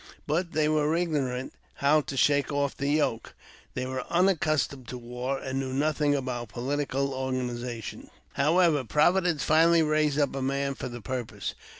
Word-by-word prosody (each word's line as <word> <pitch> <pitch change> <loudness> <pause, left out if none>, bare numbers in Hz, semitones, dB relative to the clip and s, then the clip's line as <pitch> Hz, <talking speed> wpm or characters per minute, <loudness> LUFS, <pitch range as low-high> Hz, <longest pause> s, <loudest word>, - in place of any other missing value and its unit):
But 170 +3 -1
they 155 0 +2
were 155 0 +2
ignorant 140 -7 -1 0.2
how 150 +2 +3
to 140 -1 -6
shake 145 +2 +3
off 140 -1 0
the 140 - -3
yoke; 145 -6 0 0.4
they 125 - -2
were 130 0 -3
unaccustomed 155 -7 +1
to 125 - -6
war, 125 +3 -4
and 135 0 -3
knew 130 -1 -3
nothing 145 +1 +1
about 125 -4 -3
political 140 +3 -2
organizations. 125 -3 -4 0.2
However, 160 -2 +3
Providence 170 - +2
finally 165 +1 +5
raised 155 -1 +1
up 145 -2 +1
a 135 - -2
man 140 +1 -1
for 135 - -6
the 120 -1 -8
purpose. 125 -1 -4
140 Hz, 160 wpm, -27 LUFS, 130-155 Hz, 0.4 s, finally